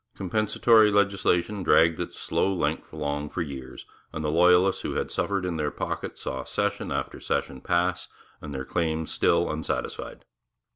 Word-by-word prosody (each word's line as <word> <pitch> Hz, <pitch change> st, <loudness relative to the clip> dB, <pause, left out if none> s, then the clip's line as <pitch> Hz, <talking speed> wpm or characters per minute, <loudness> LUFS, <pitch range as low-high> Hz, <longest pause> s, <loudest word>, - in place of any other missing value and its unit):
Compensatory 110 Hz, +3 st, +4 dB
legislation 100 Hz, -1 st, +1 dB
dragged 85 Hz, -2 st, +4 dB
its 90 Hz, -, -5 dB
slow 95 Hz, -, 0 dB
length 95 Hz, -, -2 dB
along 75 Hz, -1 st, -3 dB
for 90 Hz, -, -2 dB
years, 65 Hz, -3 st, -8 dB, 0.3 s
and 80 Hz, 0 st, -4 dB
the 75 Hz, -, +1 dB
loyalists 90 Hz, +3 st, +4 dB
who -, -, -4 dB
had -, -, -2 dB
suffered 100 Hz, -2 st, -1 dB
in 85 Hz, -3 st, -2 dB
their 75 Hz, -1 st, 0 dB
pocket -, -, -4 dB
saw 65 Hz, 0 st, -4 dB
session -, -, -2 dB
after -, -, -3 dB
session 65 Hz, -, -2 dB
pass, 90 Hz, +1 st, 0 dB, 0.3 s
and 75 Hz, -, -7 dB
their 65 Hz, -1 st, -4 dB
claims 80 Hz, -1 st, -1 dB
still -, -, +2 dB
unsatisfied. -, -, -4 dB
85 Hz, 155 wpm, -26 LUFS, 75-95 Hz, 0.3 s, Compensatory